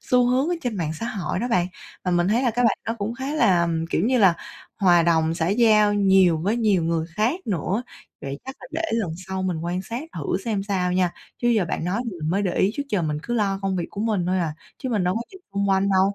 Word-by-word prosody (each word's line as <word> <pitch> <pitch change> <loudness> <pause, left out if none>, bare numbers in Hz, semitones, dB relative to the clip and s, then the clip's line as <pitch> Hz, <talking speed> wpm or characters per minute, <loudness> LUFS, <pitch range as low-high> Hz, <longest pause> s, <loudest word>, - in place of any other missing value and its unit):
xu 250 -1 +3
hướng 260 +5 +2
ở 355 - +1
trên 240 -5 -2
mạng 160 -3 -2
xã 225 +9 -4
hội 195 -5 -3
đó 245 +4 -2
bạn. 180 -6 +2 0.4
Và 180 - 0
mình 175 +1 +2
thấy 235 +5 +2
là 245 - +2
cái 245 +2 0
bạn 225 - +3
đó 225 - -1
cũng 215 +4 -2
khá 270 +4 -4
là, 180 - +3 0.2
kiểu 180 - +1
như 250 +1 +2
là, 190 -5 +6 0.4
hòa 175 -4 +5
đồng, 165 -1 +2
xã 165 0 0
giao 215 -1 +4
nhiều 190 -4 +4
với 205 +8 0
nhiều 210 -7 +2
người 165 -1 0
khác 245 - +1
nữa. 195 - -1 0.4
Vậy 140 +1 -5
chắc 265 +1 -7
là 255 - -10
để 330 - -2
lần 220 -7 0 0.2
sau 190 0 -2
mình 175 -4 -1
quan 180 +2 -2
sát 230 +6 -5
thử 160 +2 -1
xem 210 -4 -1
sao 185 -3 -1
nha. 180 -1 +1 0.3
Chứ 240 - +1
giờ 220 -5 +3
bạn 160 - -2
nói 190 +6 -1
thì 230 - -3
mình 155 - -1
mới 195 +3 +1
để 180 -3 -1
ý, 195 - +3
trước 285 - -2
giờ 200 -7 0
mình 150 -2 -1
cứ 240 - -3
lo 200 -3 +1
công 190 -1 0
việc 170 - -2
của 200 - -6
mình 210 -5 0
thôi 185 +1 +1
à, 160 -3 -1 0.2
chứ 260 - -4
mình 210 -6 0
đâu 180 - +1
có 230 - -1
nhìn 380 - -12
xung 200 0 0
quanh 195 +1 +2
đâu 190 +1 +3
195 Hz, 270 wpm, -23 LUFS, 175-230 Hz, 0.4 s, là